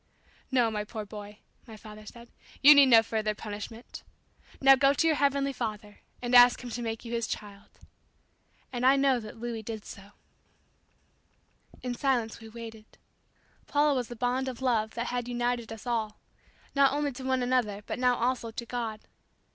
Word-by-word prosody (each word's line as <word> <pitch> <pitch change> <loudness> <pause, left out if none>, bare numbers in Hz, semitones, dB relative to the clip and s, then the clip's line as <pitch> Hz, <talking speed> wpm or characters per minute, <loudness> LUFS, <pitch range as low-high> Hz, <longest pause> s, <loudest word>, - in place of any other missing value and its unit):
"No, 245 -4 +2
my 210 -1 -2
poor 215 0 -7
boy," 210 0 -10 0.3
my 220 -1 -10
father 215 0 -12
said; 235 +2 -13 0.3
"you 295 +2 +11
need 285 -2 +7
no 230 -3 +7
further 215 -1 -2
punishment. 215 +3 -8 0.6
Now 270 0 +7
go 275 +1 +4
to 330 - +1
your 315 -2 +3
heavenly 280 0 +1
Father 210 -3 -6 0.2
and 245 0 -2
ask 245 0 +7
Him 245 - -7
to 240 - -4
make 225 0 -4
you 235 - -6
His 230 -1 -1
child." 200 -1 -8 1.0
And 245 0 -3
I 265 +2 +6
know 270 -2 +3
that 215 0 -10
Louis 230 -1 -5
did 220 -1 -7
so. 200 +1 -12 1.7
In 250 -1 -2
silence 245 -4 -1
we 225 -1 -11
waited. 225 -1 -11 0.7
Paula 295 0 +2
was 250 -3 -2
the 240 - -8
bond 250 +3 -1
of 255 -2 -5
love 230 -4 0
that 235 +1 -3
had 245 -1 -2
united 240 -1 -2
us 225 +2 -9
all; 220 -3 -2 0.6
not 275 -1 +4
only 290 0 -1
to 260 +1 -9
one 260 -1 0
another 235 -5 0
but - - -5
now 250 -1 +3
also 245 -1 -1
to 230 +1 -7
God. 230 -3 -4
235 Hz, 180 wpm, -28 LUFS, 220-255 Hz, 1.7 s, you